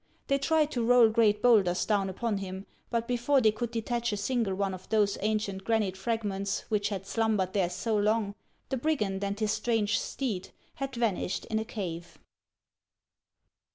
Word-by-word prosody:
They 275 0 +3
tried 305 +1 +2
to 245 -5 -1
roll 240 -1 +6
great 215 -2 +3
bowlders 200 -7 +4
down 200 -3 +1
upon 205 +2 -2
him; 190 0 -6 0.2
but 235 -1 -1
before 250 +3 +2
they 220 -4 +4
could 235 +2 -3
detach 235 +1 -2
a 205 - -2
single 215 -2 0
one 195 0 -1
of 185 0 -10
those 210 -2 +2
ancient 210 -2 -1
granite 215 -4 +1
fragments 200 -1 -2
which 210 -2 +1
had 195 -2 -4
slumbered 210 -3 0
there 190 -4 +1
so 220 +5 -2
long, 210 0 +1 0.4
the 265 - -1
brigand 215 -9 -1
and 200 +1 -2
his 215 -1 +1
strange 215 -3 +1
steed 220 -9 -3 0.2
had 275 -1 -5
vanished 225 -6 -1
in 220 - +1
a 220 - -3
cave. 175 -6 -6
215 Hz, 170 wpm, -29 LUFS, 195-235 Hz, 0.4 s, roll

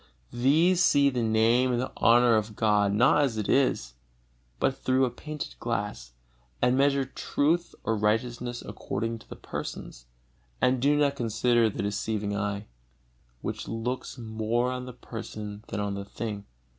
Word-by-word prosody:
These 160 +9 +4
see 140 -4 +4
the 125 -2 -1
Name 115 +3 +3
and 120 - +1
the 130 - -3
honor 120 0 +5
of 110 0 -1
God 105 -2 +3
not 120 +8 +4
as 130 -6 0
it 105 - -2
is, 130 - +2 0.7
but 135 - +1
through 130 0 +2
a 125 - -2
painted 150 +4 -6
glass, 100 - -3 0.5
and 125 - +3
measure 140 0 +3
truth 155 +5 0
or 115 - 0
righteousness 120 +3 -1
according 115 +3 -4
to - - -19
the - - -7
persons, - - -7 0.5
and 125 -1 +2
do 145 +2 +3
not 145 -1 +2
consider 120 -1 +2
their 100 - -4
deceiving 105 0 -2
eye, 100 0 -2 0.8
which - - -4
looks 120 +4 -4
more 115 +2 -1
on 125 0 -5
the 125 - -7
person 105 -3 -7
than - - -4
on 100 -1 -1
the 100 0 -5
thing. 105 -1 -5
115 Hz, 155 wpm, -27 LUFS, 105-130 Hz, 0.8 s, honor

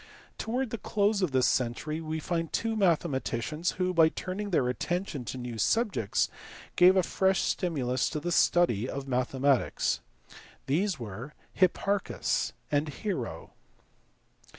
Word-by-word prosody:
Towards 245 +1 -2
the 230 - -4
close 205 +1 +1
of 185 - +2
this 130 -1 +3
century 135 +6 0
we 160 0 -3
find 165 0 -2
two 225 -1 -1
mathema 170 -8 +2
ticians 150 +9 -2
who, 185 0 -1
by 165 -2 +6
turning 190 +5 -4
their 145 -9 +2
attention 165 +1 -2
to 130 - -5
new 120 -2 -5
subjects, 205 - +1 0.5
gave 180 +1 +7
a 185 - +4
fresh 190 +1 +2
stimulus 130 -8 0
to 155 - -3
the 175 +3 -3
study 130 - +3
of 140 0 -5
mathematics. 130 +1 +1 0.7
These 175 +4 0
were 115 +6 -7 0.2
Hipparchus 195 +2 +1 0.2
and 145 +1 +1
Hero. 160 - -4
160 Hz, 135 wpm, -29 LUFS, 130-190 Hz, 0.7 s, gave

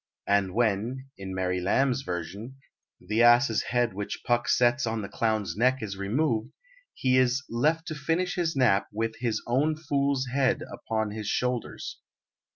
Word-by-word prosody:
And 100 -2 +1
when 120 +4 0
(in 95 -1 -7
Mary 90 -1 -1
Lamb's 130 +8 +2
version) 100 +6 -6 0.4
the 110 +2 0
ass's 120 -1 +5
head 120 -3 +1
which 100 +1 -5
Puck 120 0 +1
sets 120 +1 +3
on 110 -1 -2
the - - -4
clown's 110 -6 -1
neck 125 +2 +2
is 100 -2 -4
removed, 115 +3 -1 0.4
he 130 -1 +2
is 130 +2 +2
"left 155 +8 +1
to - - -3
finish 165 +5 -1
his 170 -4 -1
nap 120 -7 +3
with 110 +1 -2
his 115 -3 -1
own 140 +6 +1
fool's 140 -3 0
head 135 -2 +2
upon 110 -1 -2
his 105 -1 -5
shoulders." 125 +2 -2
120 Hz, 160 wpm, -27 LUFS, 105-135 Hz, 0.4 s, ass's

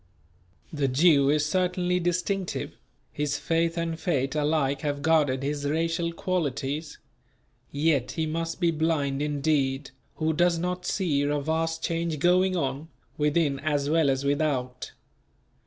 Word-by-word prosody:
The 145 -2 0
Jew 140 +1 +4
is 150 0 +2
certainly 180 +2 0
distinctive; 180 +2 -2 0.4
his 145 0 -2
faith 165 +1 0
and 165 -1 -2
fate 140 -5 0
alike 145 -2 0
have 145 -1 -2
guarded 145 -5 +2
his 145 +1 -2
racial 165 +3 0
qualities; 150 -4 -2 0.7
yet 145 -3 +1
he 160 - -1
must 165 +2 -3
be 170 -2 +3
blind 150 -3 0
indeed, 145 -2 0 0.2
who 160 0 0
does 175 +1 +2
not 180 +1 -3
see 165 -8 0
a 145 +1 0
vast 160 +2 -1
change 165 -1 -1
going 185 +4 +3
on, 140 0 -2 0.3
within 150 -1 +1
as 145 -1 0
well 160 -3 +3
as 135 +1 0
without. 140 -4 -1
155 Hz, 135 wpm, -26 LUFS, 140-165 Hz, 0.7 s, Jew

